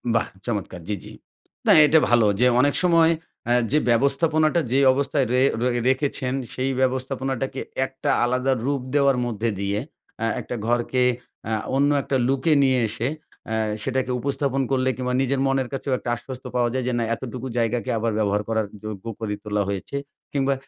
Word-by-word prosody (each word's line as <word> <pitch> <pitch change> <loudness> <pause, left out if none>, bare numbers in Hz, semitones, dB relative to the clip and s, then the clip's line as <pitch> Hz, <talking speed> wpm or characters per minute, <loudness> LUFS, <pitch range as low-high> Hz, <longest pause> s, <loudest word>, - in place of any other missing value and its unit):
বাহ 115 - +2 0.2
চমৎকার! 100 -6 -3
জি, 105 - -1
জি। - - -11 0.6
না - - +7
এটা 155 +2 +5
ভালো 120 -2 +5
যে, 125 - +5
অনেক 145 +1 +2
সময় 165 -2 +5 0.4
অ্যা 120 - +3 0.2
যে, 150 - +4
ব্যবস্থাপনাটা 155 +6 +2
যে, 135 - +3
অবস্থায় 140 0 0
ড়ে 125 - +3 0.2
রয়ে 120 -1 +1
রেখেছেন, 130 -1 0 0.2
সেই 130 +1 -1
ব্যবস্থাপনাটাকে 130 0 -1 0.2
একটা 130 0 -4 0.2
আলাদা 125 +2 +1
রূপ 140 -2 0
দেওয়ার 140 -2 +4
মধ্যে 115 -1 -1
দিয়ে, 100 +1 -1 0.4
অ্যা 115 - 0
একটা - - -5
ঘরকে 120 +1 +1 0.4
অ্যা 110 - -1 0.2
অন্য 140 +1 +3
একটা 135 - -2
লুকে 135 +4 +2
নিয়ে 130 -2 +3
এসে 115 +4 -2 0.4
অ্যা 110 0 -1 0.3
সেটাকে 130 0 -1
উপস্থাপন 135 +1 -1
করলে 130 -1 +2
কিংবা 125 -1 -2
নিজের 135 0 0
মনের 135 -2 +1
কাছেও 135 0 -2
একটা 120 - -6
আশ্বস্ত 130 +2 -9
পাওয়া 120 -1 +2
যায়, 130 - -1
যে, 125 - 0
না - - +1
এতটুকু 130 +1 -6
জায়গাকে 115 0 0
আবার 115 +1 0
ব্যবহার 105 -1 +1
করার 110 -1 +1 0.2
যোগ্য 105 -1 -6
করে 110 -2 -3
তোলা 105 -1 0
হয়েছে। 100 +7 -3 0.4
কিংবা 140 -1 +2
130 Hz, 170 wpm, -23 LUFS, 115-135 Hz, 0.6 s, না